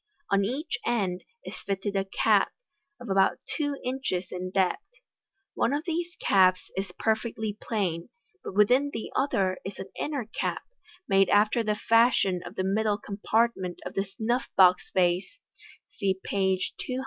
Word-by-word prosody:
On 200 0 +4
either 260 +10 -2 0.2
end 195 -7 0 0.2
is - - -6
fitted 200 0 -3
a 195 0 +1
cap, 195 - +2 0.5
of 245 - -9
about 195 -1 +3 0.2
two 290 -2 -1
inches 250 -8 -2
in 180 0 -4
depth. 190 - +1 0.7
One - - +1
of 295 +2 -1
these 340 0 -2
caps 185 -1 +3
is 190 -1 -3
perfectly 220 -1 -1
plain, 180 -7 -2 0.3
but - - -7
within 250 +8 +4
the 225 - -5
other 195 -9 +1
is 195 - -6
an 190 - -8
inner 285 -6 -2
cap, 220 - -3 0.4
made 195 0 +4
after 210 +3 +4
the 210 -1 0
fashion 225 -5 +3
of - - -9
the 185 - -1
middle 205 +2 +1
com 200 -1 -7
partment 215 -4 0
of - - -5
the 195 - 0
snuff 220 +6 -2
box 180 -1 +5
vase 180 - +1 0.6
(see 195 -3 +1
page 190 -1 0
217). 255 0 -3
200 Hz, 160 wpm, -27 LUFS, 190-235 Hz, 0.7 s, box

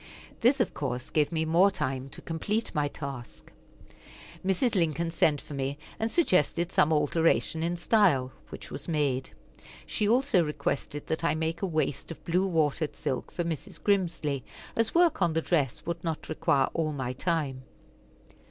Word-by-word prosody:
This, 260 +4 +4
of 240 - +1
course, 130 -3 -4
gave 150 0 +2
me 160 -1 0
more 170 +5 +5
time 135 -8 -3
to - - -11
complete 205 +7 -2
my 150 -1 +1
task. 140 -4 -8 0.9
Mrs. 195 +6 +1
Lincoln 165 -3 +1
sent 150 -3 +3
for 145 - -10
me, 135 +1 -2 0.2
and 225 - 0
suggested 180 - +2
some 155 -3 +3
alteration 160 +1 +2
in 170 +1 -1
style, 170 - +3 0.2
which - - -9
was - - -6
made. 145 -5 0 0.6
She 210 - 0
also 245 -6 +4
requested 150 -1 -3
that 160 - -2
I 165 -2 +2
make 160 +1 -2
a 195 - 0
waist 155 -4 -1
of 165 - -9
blue 180 +3 +2
watered 155 -3 0
silk 130 - -3
for 175 - -2
Mrs. 165 -4 -5
Grimsly, 165 - +1 0.3
as 230 +4 0
work 340 - +4
on 170 -3 +3
the 160 - +1
dress 145 -8 0
would 170 0 -3
not 165 -2 -3
require 140 -3 +2
all 155 -2 0
my 130 -3 -3
time. 145 -3 -1
160 Hz, 165 wpm, -28 LUFS, 145-180 Hz, 0.9 s, more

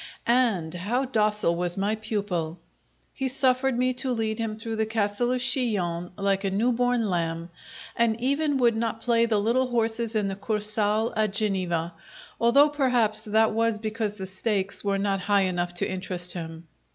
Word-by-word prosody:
And 225 -10 +2
how 220 +10 -1
docile 210 -7 +1
was 175 +1 -2
my 200 +2 +1
pupil! 200 -7 -3 0.6
He 265 - -2
suffered 260 -1 +1
me 255 +1 +2
to 255 +1 -2
lead 220 -2 -1
him 220 -1 -2
through 225 0 -5
the 220 - +1
Castle 220 +2 0
of 255 0 0
Chillon 205 -10 +1
like 195 -1 0
a 195 - +1
new 215 +6 +1
born 245 -1 +1
lamb, 165 -2 -2 0.4
and 235 -1 +1
even 280 +3 +1
would 240 -3 +3
not 225 0 -2
play 235 -1 +3
the 220 -2 +2
little 235 +5 +2
horses 230 -1 -1
in 210 -2 +1
the 195 - -3
Kursaal 215 +1 -1
at 215 -2 +1
Geneva, 185 -5 -1 0.5
although, 275 +6 +5
perhaps, 245 -7 +1
that 220 0 +2
was 230 0 +1
because 215 -1 -2
the 195 -2 -6
stakes 195 +1 -2
were 200 -1 +1
not 195 0 0
high 200 +1 +2
enough 175 -1 -1
to - - -1
interest 180 -1 -4
him. 165 -1 -7
215 Hz, 175 wpm, -26 LUFS, 195-235 Hz, 0.6 s, although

